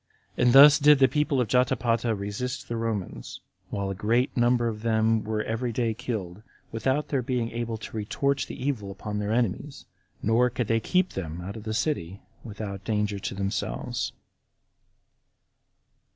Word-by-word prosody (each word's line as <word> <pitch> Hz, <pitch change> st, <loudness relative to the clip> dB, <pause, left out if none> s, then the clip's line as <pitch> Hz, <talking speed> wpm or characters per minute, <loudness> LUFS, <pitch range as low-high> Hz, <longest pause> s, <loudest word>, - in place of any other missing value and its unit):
And 125 Hz, -1 st, +3 dB
thus 145 Hz, +3 st, +9 dB
did 150 Hz, 0 st, +7 dB
the 135 Hz, -1 st, +6 dB
people 150 Hz, -1 st, 0 dB
of 125 Hz, -, +1 dB
Jotapata 120 Hz, -2 st, +1 dB
resist 105 Hz, +6 st, -4 dB
the 120 Hz, -, -3 dB
Romans, 115 Hz, -5 st, -4 dB, 0.3 s
while 100 Hz, -1 st, -2 dB
a -, -, -1 dB
great 115 Hz, +7 st, 0 dB
number 120 Hz, -1 st, +3 dB
of 110 Hz, -2 st, -4 dB
them 110 Hz, -1 st, +2 dB
were 110 Hz, 0 st, -2 dB
every 115 Hz, +2 st, -2 dB
day 115 Hz, -1 st, 0 dB
killed, 105 Hz, -6 st, -5 dB, 0.3 s
without 130 Hz, +6 st, -1 dB
their 135 Hz, -3 st, +1 dB
being 120 Hz, -2 st, -2 dB
able 115 Hz, -1 st, -3 dB
to 110 Hz, -, -9 dB
retort 140 Hz, +6 st, 0 dB
the -, -, -8 dB
evil 110 Hz, -8 st, -2 dB
upon 105 Hz, +2 st, -5 dB
their 105 Hz, 0 st, -2 dB
enemies; 120 Hz, +5 st, -1 dB, 0.4 s
nor 115 Hz, +3 st, +3 dB
could 125 Hz, 0 st, -2 dB
they 115 Hz, +2 st, +1 dB
keep 185 Hz, +9 st, +1 dB
them 85 Hz, -3 st, -5 dB
out 95 Hz, +3 st, -6 dB
of 110 Hz, -1 st, -9 dB
the 110 Hz, -, -2 dB
city 100 Hz, -, -2 dB, 0.2 s
without 100 Hz, -3 st, -6 dB
danger 105 Hz, -2 st, -1 dB
to 100 Hz, -, -4 dB
themselves. 100 Hz, 0 st, -2 dB
115 Hz, 165 wpm, -26 LUFS, 105-125 Hz, 0.4 s, thus